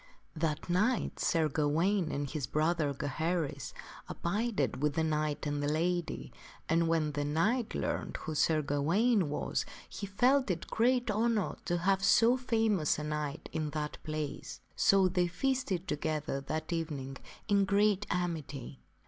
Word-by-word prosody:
That 155 -1 -1
night 210 +8 +1
Sir 160 -2 +2
Gawaine, 160 +5 +1
and 145 0 -2
his 140 -3 -3
brother, 155 -1 +1
Gaheris, 145 +1 -2 0.4
abided 200 - -1
with 150 0 +1
the 160 - +2
knight 155 -1 -1
and 145 0 -1
the 145 0 0
lady, 175 +2 -1 0.3
and 165 +1 +2
when 160 -2 +1
the 145 0 -2
knight 205 - 0
learned - - -2
who 160 - -5
Sir 155 0 +2
Gawaine 170 - +2
was, 145 - -1 0.2
he 200 - -6
felt 255 +6 +3
it 170 -3 -1
great 245 0 +2
honor 220 -1 +1
to 175 -1 0
have 190 +2 +1
so 235 +4 +5
famous 225 - +1
a 150 - -4
knight 150 -1 -3
in 155 -2 -1
that 150 -1 -3
place. 155 -2 -4 0.2
So 195 -1 +5
they 180 -1 +1
feasted 190 -2 -1
together 150 -2 -2
that 155 +2 -2
evening 145 -5 -3 0.3
in 200 -2 +3
great 205 0 +2
amity. 155 -7 -3
165 Hz, 150 wpm, -32 LUFS, 150-200 Hz, 0.4 s, so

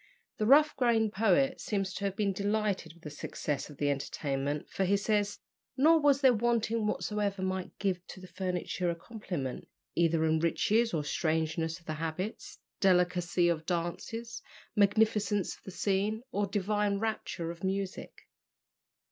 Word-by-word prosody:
The 215 - +1
rough 300 +4 +6
grained 225 -4 +2
poet 245 +6 +2
seems 195 -3 -2
to 200 - -4
have 195 -1 -1
been 200 -2 0
delighted 200 -4 -1
with 170 - -21
the 150 - -7
success 145 0 -4
of 145 - -12
the 145 -1 +1
entertainment, 140 +1 -2
for 195 - -2
he 195 +2 +3
says, 205 0 0 0.4
"Nor 320 +4 +6
was 285 -2 +4
there 260 -2 +6
wanting 230 -1 +1
whatsoever 205 -2 -1
might 185 -1 -3
give 185 -3 -1
to - - -9
the 185 - -10
furniture 180 -1 -2
a 170 - -1
complement, 170 - -5 0.3
either 165 -1 +2
in 160 0 +2
riches 215 +8 +2
or 155 -3 -1
strangeness 160 +2 -1
of 170 - -25
the 155 - -3
habits, 165 +7 -4 0.2
delicacy 180 -2 +3
of 160 -2 -1
dances, 225 +7 -3 0.3
magnificence 210 -1 +2
of - - -23
the - - -10
scene, 205 +4 0
or 205 -3 0
divine 205 +1 0
rapture 215 -6 -3
of 170 +1 -12
music." 195 0 -4
195 Hz, 155 wpm, -31 LUFS, 170-215 Hz, 0.4 s, rough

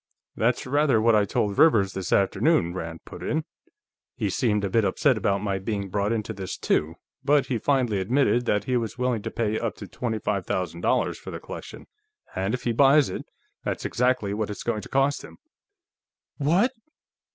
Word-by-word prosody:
"That's 120 +2 +1
rather 140 -2 +3
what 115 +1 +4
I 105 -1 +4
told 100 0 -1
Rivers, 100 - +5
this 95 -2 -4
afternoon," 100 - +2
Rand 80 -2 -6
put - - -10
in. - - -1 0.7
"He 100 - -1
seemed 105 -1 +1
a 100 - 0
bit 115 +1 +3
upset 130 +6 +2
about 100 -2 0
my 100 -2 -1
being 100 0 -3
brought 100 +2 0
into 110 -1 -2
this, 95 -2 -5
too, 80 +2 0 0.3
but 140 -1 +3
he 125 -4 -2
finally 125 -6 +1
admitted 120 +4 +2
that 105 -1 +2
he 125 +3 0
was 115 0 -3
willing 125 -3 0
to - - -4
pay 110 -1 -1
up 115 -2 -2
to 100 - -9
twenty 110 +4 -3
five 100 -3 -2
thousand 85 -2 -2
dollars - - +1
for - - -9
the - - -6
collection, - - -9 0.5
and 95 +5 0
if 125 - -8
he 120 - +1
buys 140 0 +5
it, - - -6 0.4
that's - - -3
exactly 125 -5 +1
what 105 0 -2
it's 105 - -6
going 110 -3 -1
to - - -11
cost 135 +1 +1
him." - - -12 1.0
"_What? 175 - +3
110 Hz, 195 wpm, -25 LUFS, 100-125 Hz, 1.0 s, Rivers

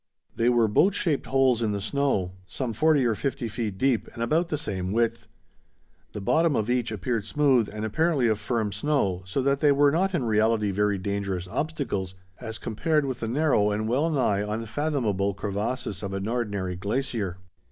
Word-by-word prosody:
They 115 +1 +2
were 120 -2 +4
boat 185 - +3
shaped 155 -6 0
holes 130 -3 +3
in 110 -2 0
the 100 - -2
snow 105 -4 0 0.2
some 125 +2 -3
forty 150 +2 +3
or 115 - +2
fifty 130 +1 -3
feet 110 -3 -4
deep 130 +1 +1
and 115 - -3
about 165 +8 +1
the 150 - -1
same 95 -7 -3
width. 115 +1 0 0.9
The 105 - -5
bottom 160 +8 +2
of 110 +2 0
each 125 -2 0
appeared 110 +2 -2
smooth 130 -1 +2
and 105 +1 -4
apparently 145 +2 +1
of 110 -2 +1
firm 110 -1 -1
snow, 100 -4 0
so 130 +8 -1
that 140 +1 +2
they 145 -1 +4
were 140 0 +4
not 185 +4 +1
in 160 - 0
reality 110 -1 +2
very 105 +1 +1
dangerous 95 -2 -3
obstacles, 105 - -3 0.2
as 110 -2 -6
compared 150 +8 0
with 130 -3 -3
the 115 - -3
narrow 125 -5 +2
and 105 +1 -1
wellnigh 130 -5 +1
unfathomable 110 -2 -1
crevasses 105 +1 -3
of 100 -2 -4
an 95 +1 -3
ordinary 100 -6 -2
glacier. 105 -1 -2
115 Hz, 180 wpm, -26 LUFS, 105-140 Hz, 0.9 s, were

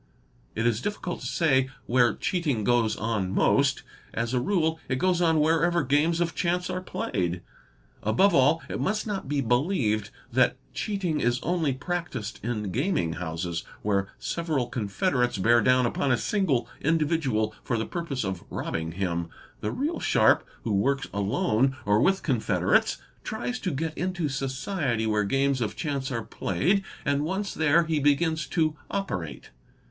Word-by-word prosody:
It 115 - -1
is 120 -1 +2
difficult 195 -2 -3
to - - -5
say 130 -6 +2 0.2
where 120 -1 +3
cheating 150 - -1
goes 120 -1 +2
on 105 -4 -1
most; - - +2 0.3
as 115 +2 -1
a 125 - +2
rule 160 0 +1
it 130 - +1
goes 180 +5 +1
on 165 -2 +4
© - - +3
where 160 +1 +3
ever 170 -2 +2
games 150 +5 +2
of 170 -1 0
chance 180 +1 0
are 185 - -3
played. 90 - -2 0.6
Above 150 - +3
all 150 +3 +4
it - - -4
must 210 +2 0
not 200 -10 -4
be 145 -1 +1
believed 120 - +1
— - - -26
that - - +3 0.2
cheating 185 -7 -1
is 120 +1 +1
only 165 -4 +1
practised 135 - -4
in 105 -4 -2
gaming 125 - 0
houses 85 0 -3 0.2
where 100 -2 +1
several 160 -7 -1
confede 115 - -1
rates 125 -3 +1
bear 120 +5 +4
down 125 +2 +4
upon 135 +3 0
a 125 - +4
single 175 - 0
individual 145 -9 +1
for 120 - -1
the 110 - -1
purpose 165 -8 -3
of 95 -3 -3
robbing 80 0 -3
him, 85 -2 -2 0.3
the 105 - -2
real 300 +6 -2
sharp - - +4 0.2
who 110 - -1
works 135 +8 +1
alone 110 +6 +1
or 105 +2 +3
with 190 +6 +2
confederates 125 -7 +2 0.3
tries 245 +3 -3
to 190 - -2
get 160 +1 -3
into 180 -3 -1
society 135 - -1
where 105 -1 +1
games 135 +3 +1
of 110 - -2
chance 140 -3 -2
are 115 -3 -2
played, 175 - 0 0.2
and 140 +1 +1
once 190 +5 -2
there 160 +2 +4
he 160 -2 0
begins 155 +2 +2
to 155 -4 +1
operate. 90 - -4
135 Hz, 165 wpm, -27 LUFS, 110-170 Hz, 0.6 s, on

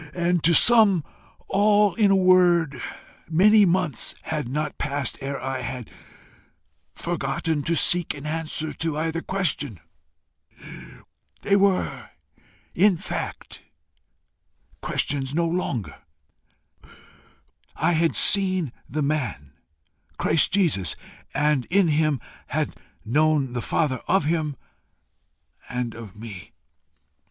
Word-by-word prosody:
And, 175 -1 0
to 170 0 +5
sum 215 -7 +6 0.4
all 205 -1 +3
in 210 0 +2
a 195 - +4
word, 175 -7 +3 0.5
many 205 +6 +5
months 175 -4 -1
had 155 -5 -3
not 150 +2 -3
passed 140 -3 -2
ere 135 0 -4
I 135 0 -4
had 125 -1 -7 1.0
forgotten 160 -1 -2
to 170 +3 -1
seek 175 0 +4
an 145 0 -10
answer 155 0 -2
to 160 -2 -3
either 165 +1 -2
question: 150 - -2 1.6
they 200 - +2
were 195 -1 0 0.6
in 195 -1 +3
fact - - -6 1.2
questions 140 0 -2
no 170 0 +1
longer: 165 - -3 1.8
I - - +1
had 165 0 +1
seen 185 - +3 0.2
the 150 +3 -2
man 130 - -3 0.6
Christ 155 -1 +1
Jesus, 150 - +1 0.4
and 150 -4 0
in 190 -1 +2
him 155 -2 +1 0.3
had - - -2 0.3
known 145 +1 +1
the 120 - -3
Father 135 -2 -1
of 190 -4 +2
him 155 -2 -1 1.1
and 125 -2 -3
of 110 -4 -11
me. 105 -4 -10
155 Hz, 110 wpm, -23 LUFS, 135-180 Hz, 1.8 s, sum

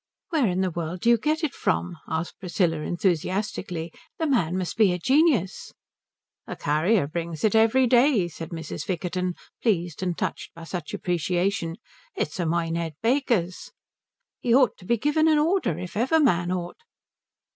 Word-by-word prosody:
"Where 305 -8 +2
in 185 0 0
the 185 -1 0
world 170 +1 -4
do 235 - +4
you 235 - +5
get 310 +6 0
it 305 - 0
from?" 180 0 -1
asked 160 +2 -3
Priscilla 175 -3 0
enthusiastically. 175 +1 -2 0.2
"The 325 - -1
man 185 - +1
must 185 -2 -3
be 215 -4 +4
a 180 - -1
genius." 260 - +2 0.7
"The - - -5
carrier 155 +6 +2
brings 165 0 -5
it 215 - +3
every 225 +4 +4
day," 245 -5 +4
said 165 -1 -8
Mrs. 165 -1 -6
Vickerton, 180 -1 -2 0.3
pleased 175 -7 0
and 180 -2 -2
touched - - -4
by 165 - -10
such 165 -2 -5
appreciation. 175 0 -1 0.4
"It's 150 +5 -3
a 175 - 0
Minehead 165 -1 -1
baker's." 230 -8 0 0.7
"He 235 -1 +2
ought 260 -3 +4
to 180 - -14
be 235 - +2
given 295 +6 +2
an 310 -1 +4
order, 310 - +1
if 180 0 -7
ever 260 +9 +2
man 180 - +2
ought." 175 -1 -4
180 Hz, 165 wpm, -25 LUFS, 170-235 Hz, 0.7 s, you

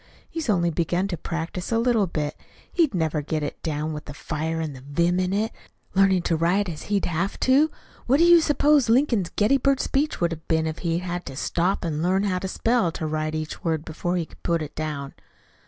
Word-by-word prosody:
He's 325 -7 -4
only 175 -4 +2
begun 175 +3 0
to 180 - -1
practice 170 +3 -4
a 230 - +3
little 230 -4 +2
bit. 150 -3 -3 0.4
He'd 320 - +2
never 160 -3 0
get 155 +1 -2
it 145 - -5
down, 155 0 -2
with 150 - -7
the 145 - -8
fire 160 +2 -3
and 155 -3 -3
the 130 - -11
vim 170 +6 +1
in 185 0 0
it, 210 +3 0 0.4
learning 190 -2 +4
to 170 - +1
write 175 +5 +2
as 160 -4 -6
he'd 205 -1 +1
have 175 +4 -2
to. 275 +4 +4 0.4
What 265 +3 +4
do 330 - +4
you 345 -1 +7
suppose 295 -4 +3
Lincoln's 230 - +3
Gettysburg 270 +5 +3
Speech 290 +3 0
would 170 -1 +1
have 160 -1 -7
been 160 -1 +2
if 160 0 -3
he'd 170 0 -1
had 175 0 -3
to 135 - -6
stop 175 +7 0
to 170 - -2
learn 180 +6 +1
how 185 -3 0
to 190 - -4
spell 230 +1 +1
and 165 - -3
to 160 - -3
write 155 0 -2
each 155 0 -5
word 160 -2 -1
before 175 +3 -2
he 170 - -1
could - - -19
put 170 -2 0
it 150 - -8
down?" 150 -3 -4
175 Hz, 225 wpm, -24 LUFS, 155-205 Hz, 0.4 s, you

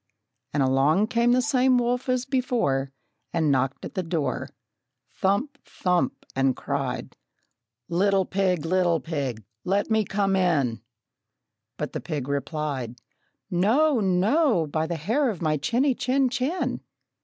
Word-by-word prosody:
And 145 -2 +1
along 145 +10 +3
came 235 +1 +2
the 250 +1 +3
same 260 -2 +3
wolf 245 +1 0
as 255 0 +1
before, 235 - 0 0.4
And 160 -3 +1
knocked 135 0 0
at - - -8
the 190 - -1
door, 165 -4 -2 0.6
Thump, 245 +10 -1
thump, 180 -1 -1
and 135 -1 +2
cried, - - -3 0.7
"Little 195 +2 +2
pig, 185 -4 0
little 175 -1 +2
pig, 140 -10 -4 0.2
let 200 +4 0
me 220 0 +3
come 195 -1 0
in!" 145 - +1 1.0
But 150 - -4
the - - -3
pig 145 -6 -4
replied, 140 -3 -3 0.6
"No, 240 - +3
no, 200 - +2
by 155 +2 -2
the 170 - -2
hair 230 - +1
of 200 -7 -4
my 155 -2 +1
chinny, 245 - +1
chin, 260 +2 +1
chin!" 270 +8 -2
185 Hz, 135 wpm, -25 LUFS, 150-245 Hz, 1.0 s, along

